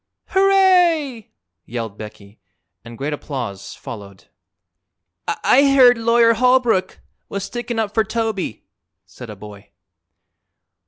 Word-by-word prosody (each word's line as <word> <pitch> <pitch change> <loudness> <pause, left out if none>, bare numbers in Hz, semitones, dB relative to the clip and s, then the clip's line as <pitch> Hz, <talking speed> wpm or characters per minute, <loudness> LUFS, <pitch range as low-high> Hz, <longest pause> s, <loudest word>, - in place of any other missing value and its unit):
"Hooray!" 360 - +3 0.4
yelled 115 -3 -5
Becky, 105 0 -12 0.4
and 115 0 -11
great 145 +4 -3
applause 120 -10 -6
followed. 100 -4 -11 1.0
"I 275 +1 +3
heard 250 -2 +7
Lawyer 230 0 +4
Holbrook 245 -5 +1 0.3
was 200 -1 -4
stickin' 240 +3 -5
up 215 -2 -2
for 220 - +2
Toby," 215 - -3 0.4
said 125 -3 -12
a 105 - -8
boy. 100 0 -13
215 Hz, 105 wpm, -20 LUFS, -, 1.0 s, heard